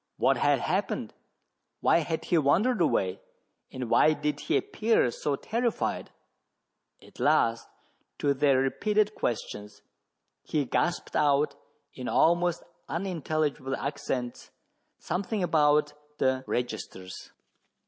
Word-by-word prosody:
What - - +3
had - - +2
happened - - -2 0.3
} - - -53
why - - +4
had 160 0 -3
he 175 - +2
wandered 185 - +2
away? 95 - +1 0.5
and 130 -2 -5
why 155 +6 +5
did 150 -1 -2
he - - +1
appear 225 - +1
so 145 +4 -2
terrified? 230 - -2 0.9
At - - -17
last, 115 0 +2 0.5
to 140 -1 +1
their 140 -1 +3
repeated 210 +11 +1
questions, 105 - -4 0.6
he 150 -3 -1
gasped 175 +6 -1
out, 145 0 +3 0.4
in 125 - -7
almost 175 +1 +2 0.3
unintelligible 155 -6 -2
accents, 130 -3 -4 0.5
something 190 +3 -2
about 150 -3 +3 0.2
the 130 -1 +1
registers. 110 -6 -5
150 Hz, 110 wpm, -28 LUFS, 130-175 Hz, 0.9 s, why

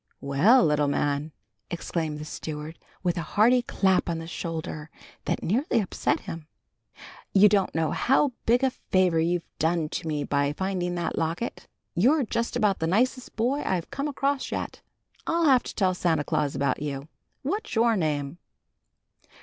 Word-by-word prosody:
"Well, 175 - +4
little 150 -1 +2
man!" 145 +1 0 0.4
exclaimed 165 -3 -3
the 150 - -7
steward, 155 +1 -6 0.2
with 175 -1 0
a 160 - -7
hearty 245 +4 +6
clap 190 -7 +1
on 170 - -1
the 165 - -6
shoulder 165 -2 -5 0.4
that - - -1
nearly 230 - +1
upset 200 - -1
him. 165 -5 -8 0.9
"You 200 +2 +8
don't 200 -4 +1
know 160 -2 +1
how 270 +2 +2 0.2
big 240 +3 +4
a 265 - +3
favor 185 -8 +1
you've 170 +1 0
done 160 -1 +1
me 150 -2 -2
by 140 0 0
finding 180 0 -2
that 175 - -2
locket. 165 +8 -3 0.3
You're 265 - +3
just 235 +1 -2
about 210 -5 +2
the 160 - 0
nicest 250 +7 0
boy 255 +6 +1
I've 180 -3 -2
come 280 +2 -2
across 280 -1 -1
yet. - - -4 0.5
I'll 335 0 +2
have 265 -4 +6
to - - -8
tell 185 -3 +2
Santa 170 -4 +1
Claus 150 -2 -1
about 140 0 0
you. 140 -1 -4 0.4
What's 400 - -3
your 230 0 +4
name?" 150 -3 -2
175 Hz, 160 wpm, -26 LUFS, 155-230 Hz, 0.9 s, You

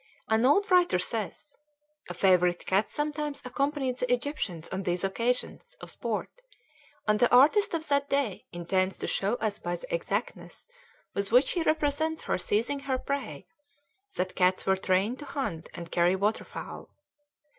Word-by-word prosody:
An 220 +3 +4
old 395 +9 +3
writer 355 - +5
says, 220 +9 -3 0.5
"A - - -5
favorite 180 -2 +3
cat 195 +3 +2
sometimes 295 -1 -3
accompanied 270 0 -1
the 250 0 -1
Egyptians 240 - -2
on 190 - -3
these 180 -1 -1
occasions 245 - -2
[of - - -7
sport], - - -3 0.8
and 210 0 +3
the 245 - +4
artist 315 - +5
of 320 -1 -3
that 280 0 +1
day 275 -9 -1
intends 185 +2 0
to - - -4
show 200 +4 0
us 215 -3 -2
by 175 0 -3
the 175 - -8
exactness 200 +6 -3 0.5
with 200 0 -2
which 250 +4 +5
he 350 - 0
represents 315 0 0
her - - -1
seizing 230 +9 0
her 275 -2 -1
prey, 255 - -4 0.7
that 185 0 -2
cats 185 0 +2
were 190 - +3
trained 190 +6 0
to 290 - -7
hunt 215 - -4
and 170 -1 -8
carry 175 +2 +3
water 205 +3 0
fowl." - - -8
230 Hz, 160 wpm, -28 LUFS, 185-285 Hz, 0.8 s, writer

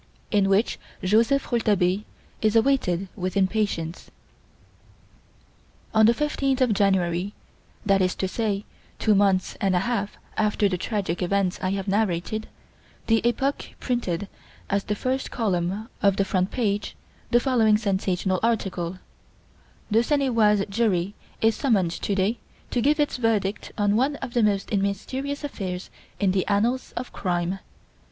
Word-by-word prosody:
In 200 -2 +3
Which 200 +4 +2 0.2
Joseph 230 +9 +2
Rouletabille 205 -5 +2 0.4
Is 215 0 +2
Awaited 220 -7 +2
with 185 +2 -3
Impatience 190 -4 -1 1.8
On 220 0 +6
the 235 - +6
15th 275 -2 0
of 250 -4 +3
January, 190 -1 +1 0.5
that 195 -1 +3
is 185 0 +1
to 190 - -1
say, 205 0 -2 0.3
two 215 - +3
months 195 -2 +2
and 195 -2 +2
a 180 - +3
half 210 -2 -2 0.2
after 210 -1 +2
the 180 -2 -2
tragic 195 -5 -2
events 185 0 0
I 185 - 0
have 195 0 -3
narrated, 205 +1 0 0.6
the 225 -1 +3
"Epoque" 270 +4 -1
printed, 205 -7 -2 0.4
as 200 0 +1
the 210 - -1
first 260 +5 -2
column 195 -1 -1
of 200 -1 +4
the 195 - +2
front 185 -1 0
page, 210 -4 -1 0.3
the 240 - +5
following 230 -5 +3
sensational 190 -3 0
article: 190 -6 -1 0.9
"The 220 +2 +5
Seine 275 +2 +1
et 240 - -2
Oise 210 -3 +4
jury 200 -3 0 0.3
is 225 -1 +3
summoned 210 - +2
to 200 +3 -2
day 200 +4 +1 0.3
to 245 - +1
give 295 +5 +3
its 295 -3 +1
verdict 220 -4 0
on 205 -1 +2
one 270 +6 +2
of 270 -4 -7
the 240 - +3
most 205 -1 +1
mysterious 260 +9 -2
affairs 190 -10 -5 0.3
in 195 -2 +3
the 190 -1 0
annals 230 +6 +1
of 250 - -5
crime. 180 0 -1
205 Hz, 145 wpm, -25 LUFS, 190-230 Hz, 1.8 s, On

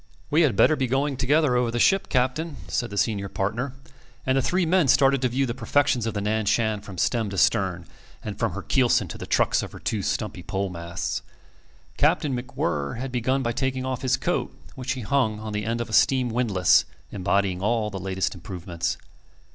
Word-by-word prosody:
"We 155 +3 +4
had 140 -10 +3
better 155 - +5
be 135 -3 -1
going 135 +3 0
together 140 +1 +2
over 125 -1 +2
the 120 - -2
ship, 195 +10 +3
Captain," 135 +5 0
said 120 - -2
the 100 - -6
senior 100 -2 0
partner; 115 +9 -2 0.5
and 130 - +2
the 135 - +3
three 180 +7 +1
men 175 -2 +3
started 135 0 +4
to 130 - +2
view 135 +3 +1
the 120 - -2
perfections 135 -2 +1
of 110 - -3
the 100 - -1
Nan 105 0 -1
Shan 110 -2 +1
from 95 -3 -10
stem 115 +3 0
to 100 - -6
stern, 95 -5 +2 0.4
and 105 -1 -6
from 115 -5 0
her 100 +1 -5
keelson 125 -3 +2
to - - -6
the - - -7
trucks - - +2
of - - -7
her - - -9
two 110 - -2
stumpy - - -2
pole 95 0 -3
masts. 85 0 -4 0.8
Captain 140 -4 +2
MacWhirr 115 - -2
had 130 +2 -4
begun 130 +2 0
by 120 - 0
taking 130 +1 -2
off 130 -1 -3
his 130 -1 +1
coat, - - -1 0.2
which 130 +1 -3
he 130 - -6
hung 110 -1 +1
on 110 0 -6
the 105 0 -2
end 115 +1 -1
of 120 - -3
a 110 - -9
steam 130 0 +4
windless 110 -6 +3 0.3
embodying 95 -1 0
all 110 0 0
the 95 - -5
latest 95 0 -2
improvements. 85 -2 -4
120 Hz, 210 wpm, -25 LUFS, 100-130 Hz, 0.8 s, better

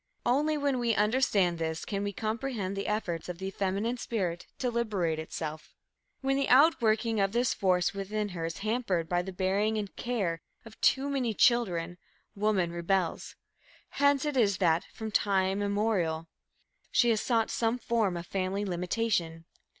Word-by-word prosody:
Only 295 +5 +2
when 285 -3 0
we 235 -2 +1
understand 210 -6 +2
this 160 0 -3
can 200 -1 -2
we 205 - -2
comprehend 215 -2 -3
the 200 - -3
efforts 180 -6 -2
of 175 - -5
the 190 +1 -4
feminine 200 +6 -1
spirit 185 -8 -3
to 250 -2 -1
liberate 200 -9 -1
itself. 155 -1 -6 0.5
When 270 0 +1
the 275 - 0
outworking 230 -6 +4
of 195 0 +1
this 240 0 +2
force 180 -1 +1
within 205 +2 -3
her 175 -3 -5
is 165 - -6
hampered 215 -7 0
by 175 +1 +1
the 190 +2 -6
bearing 195 +4 0
and 205 -2 -3
the - - -35
care 195 -10 -2 0.2
of 225 -1 -14
too 275 +1 +3
many 255 -6 -1
children, 180 -9 +2 0.4
woman 200 -4 +1
rebels. 175 +1 -1 0.5
Hence 285 0 +2
it 295 -2 -1
is 205 -6 +3
that, 170 -3 +2
from 220 -1 -6
time 195 -1 +1
immemorial, 200 -6 0 0.6
she 240 -1 +4
has 220 - +1
sought 230 -3 +1
some 230 +1 0
form 220 -6 0
of 170 - -6
family 195 +2 -2
limitation. 180 -2 -1
205 Hz, 165 wpm, -29 LUFS, 180-235 Hz, 0.6 s, outworking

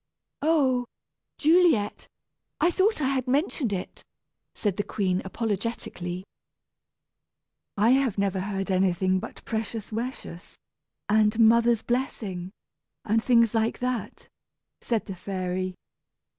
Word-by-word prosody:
"Oh 275 -5 +2 0.5
Juliet; 315 - +3 0.5
I 345 - +3
thought 380 0 +2
I 265 - +2
had 265 -2 -1
mentioned 270 - 0
it," 185 -2 -5 0.5
said 205 -4 -1
the 205 - 0
queen, 185 -3 -1
apologetically. 190 -4 -3 1.5
"I 215 +4 +4
have 260 -6 +2
never 200 -1 0
heard 195 0 -3
anything 185 0 +2
but - - -9
'pecious 225 -1 -4
wecious,' 225 -6 -6 0.5
and 215 0 +3
'mother's 230 0 +5
blessing,' 210 -8 -2 0.6
and 220 +1 +2
things 235 -3 +4
like 225 0 +1
that," 250 -2 -4 0.5
said 230 -3 -1
the 195 - -5
fairy. 185 0 -3
220 Hz, 110 wpm, -26 LUFS, 190-250 Hz, 1.5 s, mother's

